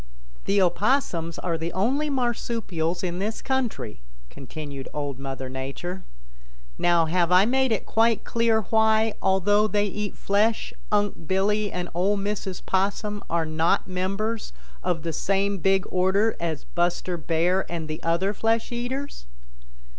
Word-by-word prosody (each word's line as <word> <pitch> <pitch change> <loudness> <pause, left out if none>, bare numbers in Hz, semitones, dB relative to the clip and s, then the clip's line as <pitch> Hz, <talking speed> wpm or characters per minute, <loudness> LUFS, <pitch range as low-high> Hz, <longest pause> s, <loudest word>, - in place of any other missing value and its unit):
"The 200 +1 +3
Opossums 175 - +1
are 170 -2 -2
the 165 +1 -3
only 265 +10 +1
Marsupials 230 - -1
in 175 -1 -2
this 215 +3 -2
country," 245 - -2 0.3
continued 140 0 -7
Old 145 -3 -3
Mother 135 -1 -5
Nature. 135 +8 -5 0.7
"Now 170 -1 +4
have 170 +1 +1
I 185 +2 +7
made 260 +2 +2
it 220 - 0
quite 225 -1 +2
clear 230 -1 +2
why, 220 0 +4
although 205 +3 +3
they 205 -1 +1
eat 205 0 -4
flesh, 210 +3 +1 0.2
Unc' 205 -6 0
Billy 205 +2 +1
and 180 0 -3
Ol' 190 +4 +2
Mrs. 200 -2 -3
Possum 205 +2 0
are 170 -1 +1
not 160 +3 +1
members 195 +5 -2 0.3
of 175 -4 -1
the 165 -1 -2
same 200 +3 0
big 195 +1 +2
order 190 +4 +2
as 165 -3 -2
Buster 175 +1 -1
Bear 170 +4 0
and 165 -2 -3
the 155 0 -5
other 170 +5 +1
flesh 225 +3 0
eaters?" 245 - -4
190 Hz, 140 wpm, -25 LUFS, 170-215 Hz, 0.7 s, I